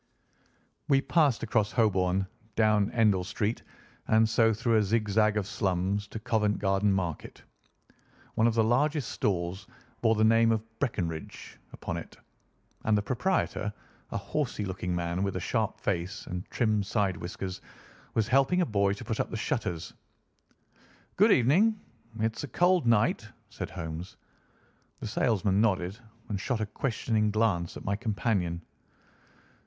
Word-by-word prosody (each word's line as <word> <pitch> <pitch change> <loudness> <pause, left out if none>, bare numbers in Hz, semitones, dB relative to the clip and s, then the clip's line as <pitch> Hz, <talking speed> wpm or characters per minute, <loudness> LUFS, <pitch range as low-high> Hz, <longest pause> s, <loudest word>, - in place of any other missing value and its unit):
We 135 -3 +4
passed 145 -5 +2
across 105 -2 +1
Holborn, 95 -4 +2 0.3
down 105 -2 +3
Endell 105 -6 +3
Street, 105 +4 -2 0.5
and 110 0 +4
so 115 0 +3
through 115 +1 +1
a - - +4
zigzag 105 0 +2
of 105 - 0
slums 100 0 -1
to 110 - -7
Covent 110 -2 +1
Garden 100 0 +2
Market. 90 -5 -3 0.9
One 110 - +3
of 115 - +1
the 115 - +4
largest 140 +5 +1
stalls 95 -3 -2 0.3
bore 115 -1 +4
the 110 - +2
name 115 +1 +5
of 110 -1 0 0.2
Breckinridge 85 - -4
upon - - -5
it, - - -9 0.7
and 110 -1 +3
the 105 - 0
proprietor 125 - 0 0.4
a - - -3
horsey 130 -8 -2
looking 90 -2 -3
man, 85 +1 -2
with 100 -1 -1
a - - -1
sharp 110 +5 -1
face 95 +1 -2
and 90 +1 -6
trim 110 -3 +1
side 100 -2 0
whiskers 95 +1 -6 0.5
was 110 -2 +2
helping 135 +7 +3
a - - +3
boy 100 -3 +1
to 100 - -8
put 110 -3 -3
up - - 0
the 110 - -4
shutters. 110 - -3 1.2
"Good - - +5
evening. 195 - +4 0.4
It's 110 +3 -1
a - - -4
cold 175 +2 +2
night," 115 -3 +2 0.2
said - - -5
Holmes. 80 +3 -6 0.8
The - - -6
salesman 100 -2 +1
nodded 95 -2 0 0.3
and 105 -4 -3
shot 120 0 -1
a 110 - 0
questioning 110 -1 0
glance 100 -5 0
at - - -10
my 100 - 0
companion. 100 -6 -1
105 Hz, 150 wpm, -29 LUFS, 95-115 Hz, 1.2 s, name